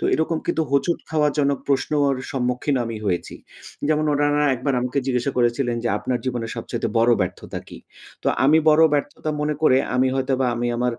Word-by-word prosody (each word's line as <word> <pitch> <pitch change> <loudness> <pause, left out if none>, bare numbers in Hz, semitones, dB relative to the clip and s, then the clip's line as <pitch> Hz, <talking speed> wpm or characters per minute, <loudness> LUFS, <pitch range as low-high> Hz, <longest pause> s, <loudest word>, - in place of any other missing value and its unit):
তো - - -3
এরকম 160 +1 0
কিন্তু 160 - +1
হোঁচট 140 +5 +1
খাওয়া 155 -2 +2
জনক 140 -1 +2
প্রশ্নর 140 0 +1 0.2
সম্মুখীন 125 +2 -1
আমি 115 -1 -5
হয়েছি। 90 -4 -2 0.5
যেমন 155 0 +2
উনারা 145 0 +2
একবার 135 +3 -1
আমাকে 125 +3 -2
জিজ্ঞাসা 125 +1 0
করেছিলেন 120 0 +1
যে - - +1
আপনার 125 +2 -2
জীবনে 120 -3 -2
সবচাইতে - - -3
বড় 115 +1 +4
ব্যর্থতা 90 -1 -4
কী? - - -10 0.4
তো - - +1 0.2
আমি 150 +4 +5
বড় 155 +1 +6
ব্যর্থতা 145 +1 -2
মনে 150 0 0
করে 130 -4 +5 0.2
আমি 130 +1 +3
হয়তোবা 135 -1 0
আমি 120 +1 -2
আমার 125 +1 0
135 Hz, 180 wpm, -22 LUFS, 125-150 Hz, 0.5 s, বড়